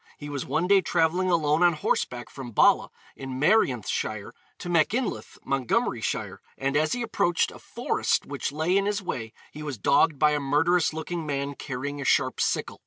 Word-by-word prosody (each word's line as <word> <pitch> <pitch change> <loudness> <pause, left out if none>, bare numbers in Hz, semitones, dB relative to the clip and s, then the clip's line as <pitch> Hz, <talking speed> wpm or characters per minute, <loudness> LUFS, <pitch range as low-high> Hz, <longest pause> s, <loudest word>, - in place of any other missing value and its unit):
He 145 - -8
was 140 -2 -4
one 155 +6 0
day 195 +1 +5
travelling 175 +2 +1
alone 155 -2 +2
on 175 -1 +5
horseback 125 -5 -2
from 135 -3 -8
Bala, - - +4 0.3
in 130 -1 -6
Merionethshire, 125 - +1 0.3
to 180 - -8
Machynlleth, 175 - 0
Montgomeryshire, 135 -3 -1 0.2
and 135 +1 -1
as 155 +1 +2
he 245 -1 -2
approached 175 -6 +1
a - - -12
forest - - -1
which - - -4
lay 160 +5 0
in 200 0 +2
his 205 -1 -1
way 115 -10 -4 0.2
he 150 - -9
was 145 -5 -5
dogged 140 +6 +3
by 150 +2 +4
a 150 - +1
murderous 155 +5 +2
looking 160 +1 -5
man 140 0 -2
carrying 140 +1 -5
a - - -5
sharp - - +2
sickle. - - -1
150 Hz, 175 wpm, -26 LUFS, 135-175 Hz, 0.3 s, day